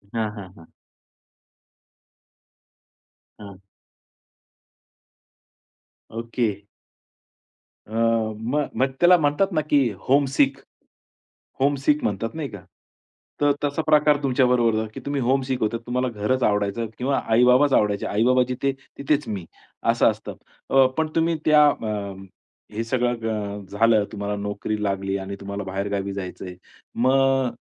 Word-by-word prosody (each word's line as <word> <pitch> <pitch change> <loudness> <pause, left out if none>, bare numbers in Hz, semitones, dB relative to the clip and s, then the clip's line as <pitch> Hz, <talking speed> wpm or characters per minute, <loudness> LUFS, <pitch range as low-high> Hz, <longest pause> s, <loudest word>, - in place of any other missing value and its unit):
हां, 110 -2 0
हां, 95 -4 -9
हां. 85 -1 -15 2.7
हां. 100 -2 -11 2.5
ओके. 115 -2 -2 1.3
अ, - - -11
म 115 +4 0
मग 130 - +3
त्याला 175 +1 +7
म्हणतात 155 +6 +1
ना 155 - +2
की 145 - +4 0.3
होमसिक. 135 0 +3 1.0
होमसिक 140 +2 +1
म्हणतात 110 +3 -2
नाही 155 -3 -3
का? 105 - -9 0.8
त - - -1
तर 145 - +5
तसा 145 +2 0
प्रकार 150 -1 +4
तुमच्या 130 -1 +2
बरोबर 120 -3 +2
झाला 110 0 -1
की - - -7
तुम्ही 140 -1 -1
होमसिक 130 +1 0
होता. 110 +2 0
तुम्हाला 125 +1 0
घरच 130 +4 +1
आवडायचं 105 +2 0
किंवा 135 +2 0
आई-बाबाच 125 +4 +5
आवडायचे. 105 -1 +2
आई-बाबा 125 +5 +3
जिथे 135 +2 -1 0.3
तिथेच 145 +1 0
मी. 95 -5 -4 0.5
असं - - +3
असतं. - - -9 0.3
अ, 135 -1 +5
पण 160 0 +1
तुम्ही 165 0 +2
त्या 150 -1 +6
अ, 110 -5 -3 0.8
हे 115 - -2
सगळं 120 +1 0
ग, 105 -2 -3
झालं 110 +1 +3
तुम्हाला 100 0 -3
नोकरी 105 +1 -3
लागली 100 -1 -1
आणि 100 +1 -6
तुम्हाला 100 0 -5
बाहेरगावी 100 +1 -3
जायचं 95 -1 -6
आहे. 90 - -8 0.5
मग 135 0 +3
120 Hz, 125 wpm, -23 LUFS, 105-135 Hz, 2.7 s, त्याला